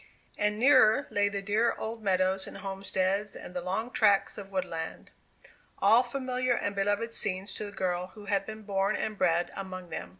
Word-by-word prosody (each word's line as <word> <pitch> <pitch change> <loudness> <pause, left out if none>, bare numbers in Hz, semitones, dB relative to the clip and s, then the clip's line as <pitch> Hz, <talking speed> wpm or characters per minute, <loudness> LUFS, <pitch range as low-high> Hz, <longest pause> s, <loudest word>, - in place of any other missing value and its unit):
And 210 0 0
nearer 255 0 +5
lay 205 0 +2
the 200 -1 -4
dearer 220 +3 +1
old 225 +1 -5
meadows 190 -1 +2
and - - -9
homesteads 195 +1 -1
and - - -9
the 180 - -3
long 195 +7 -2
tracts 205 -4 +3
of 200 -2 -8
woodland, 175 -4 -4 0.7
all 220 +5 +6
familiar 255 0 -1
and 200 -3 -2
beloved 205 +3 0
scenes 190 -1 -3
to 215 - -4
the 205 - -7
girl 180 -2 -2
who 210 -1 -11
had 200 -1 +1
been 215 0 -7
born 200 0 0
and 215 - -2
bred 175 -3 +1
among 185 -3 -7
them. 160 - -5
200 Hz, 180 wpm, -29 LUFS, 190-220 Hz, 0.7 s, all